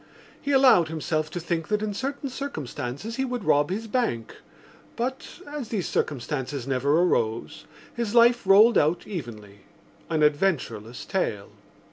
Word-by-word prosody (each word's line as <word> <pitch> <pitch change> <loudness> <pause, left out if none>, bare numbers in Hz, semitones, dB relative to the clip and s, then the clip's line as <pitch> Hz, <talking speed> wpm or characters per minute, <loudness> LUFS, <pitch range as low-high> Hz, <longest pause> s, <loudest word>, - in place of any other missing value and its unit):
He 285 - -2
allowed 260 - +6
himself 155 0 -2
to 175 - -5
think 165 -1 -2
that 210 0 0
in 210 -1 -2
certain 275 +6 -4
circumstances 225 - -5
he 265 - 0
would 250 -4 -3
rob 145 -2 +3
his 210 +5 -3
bank 215 - -2 0.6
but, 260 +7 -4
as 290 -5 -6
these 200 -6 -2
circumstances 135 -1 -2
never 140 +5 +2
arose, 110 - -1 0.3
his 235 -1 -2
life 240 -2 +5
rolled 215 +4 +7
out 155 +4 +1
evenly—an 120 - -6
adventureless 145 - 0
tale. 110 - -2
175 Hz, 135 wpm, -25 LUFS, -, 0.6 s, rolled